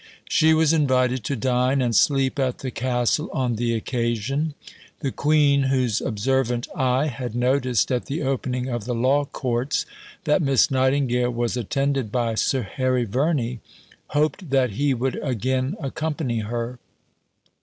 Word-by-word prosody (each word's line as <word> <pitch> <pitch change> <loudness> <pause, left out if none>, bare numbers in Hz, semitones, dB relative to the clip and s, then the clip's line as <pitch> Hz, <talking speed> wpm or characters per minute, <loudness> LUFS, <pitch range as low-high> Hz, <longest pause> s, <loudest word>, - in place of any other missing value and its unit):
She 160 0 +4
was 160 0 +3
invited 130 -5 +2
to 140 - -1
dine 125 +3 +1
and 120 -3 +1
sleep 135 +4 +2
at 130 -2 0
the 130 - -2
castle 125 +5 0
on 125 -3 -1
the 115 0 0
occasion. 120 +6 -1 0.5
The 135 -4 -1
Queen, 145 -1 +3
whose 125 -5 +1
observant 120 +1 0
eye 130 +1 +1
had 125 -4 -4
noticed 125 -2 +1
at 125 -1 -1
the 150 +3 -3
opening 130 -1 -2
of 120 -4 -3
the 125 0 -2
Law 135 +5 +2
Courts 125 0 -2 0.4
that 150 +4 +2
Miss 140 +1 +3
Nightingale 130 -2 +2
was 120 0 -1
attended 135 0 -1
by 120 -2 0
Sir 130 +3 0
Harry 130 +3 0
Verney, 125 0 0 0.5
hoped 155 +4 -1
that 130 -3 +2
he 140 +6 +1
would 130 +2 -2
again 130 - -1
accompany 145 -4 -2
her. 120 +3 -4
130 Hz, 145 wpm, -23 LUFS, 120-140 Hz, 0.5 s, She